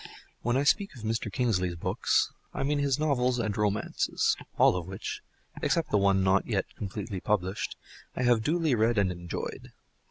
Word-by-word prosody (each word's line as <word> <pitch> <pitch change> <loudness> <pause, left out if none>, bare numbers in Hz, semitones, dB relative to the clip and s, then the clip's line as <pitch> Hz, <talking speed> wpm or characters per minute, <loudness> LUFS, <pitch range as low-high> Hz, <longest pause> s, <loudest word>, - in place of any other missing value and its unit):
When 120 +2 +1
I 140 - +2
speak 195 +4 +2
of 115 - -11
Mr. 110 -1 -2
Kingsley's 95 -7 0
books, 80 - +1 0.2
I - - -1
mean 145 +1 +1
his 140 -2 +1
novels 130 -5 +1
and 110 -4 -1
romances, 105 -1 +1 0.2
all - - +5
of 90 -1 -4
which 95 0 -5 0.4
(except 165 - +1
the 105 - +4
one 100 -1 +3
not 95 +1 +3
yet - - 0
completely 100 0 -5
published) 95 -2 -1 0.4
I 125 - -1
have 120 -2 +4
duly 160 +3 +1
read 115 0 +2
and 100 -2 +3
enjoyed. 85 -1 -6
110 Hz, 170 wpm, -29 LUFS, 95-125 Hz, 0.4 s, all